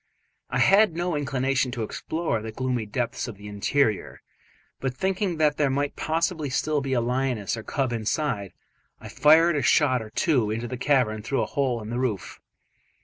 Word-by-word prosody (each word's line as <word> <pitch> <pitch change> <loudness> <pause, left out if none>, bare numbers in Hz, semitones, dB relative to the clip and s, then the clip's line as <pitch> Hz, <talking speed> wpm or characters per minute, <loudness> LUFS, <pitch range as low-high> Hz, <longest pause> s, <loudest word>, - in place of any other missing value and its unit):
I - - -1
had 200 -4 +5
no 175 -1 -1
inclination 135 -2 0
to 120 -4 -3
explore 155 +1 -2
the 110 0 -6
gloomy 125 -1 -2
depths 120 +4 -2
of 115 -4 -8
the 105 +1 -10
interior, 105 +2 0 0.6
but 130 -1 -3
thinking 190 +2 -1
that 150 -2 +2
there 145 -2 +2
might 140 +2 -1
possibly 160 -1 -1
still 150 +3 0
be 135 -1 -2
a 125 - +2
lioness 125 -3 -1
or 110 - -6
cub 130 +2 -2
inside, 110 -2 -2 0.5
I - - -10
fired 160 +4 +5
a 145 - +1
shot 130 -1 +3
or 110 - -8
two 125 -3 +1
into 115 +3 -3
the 125 - -5
cavern 125 -5 +1
through 135 +5 -1
a - - -1
hole 125 -5 -1
in 105 - -7
the 120 - -2
roof. 110 -8 -3
130 Hz, 185 wpm, -25 LUFS, 115-150 Hz, 0.6 s, had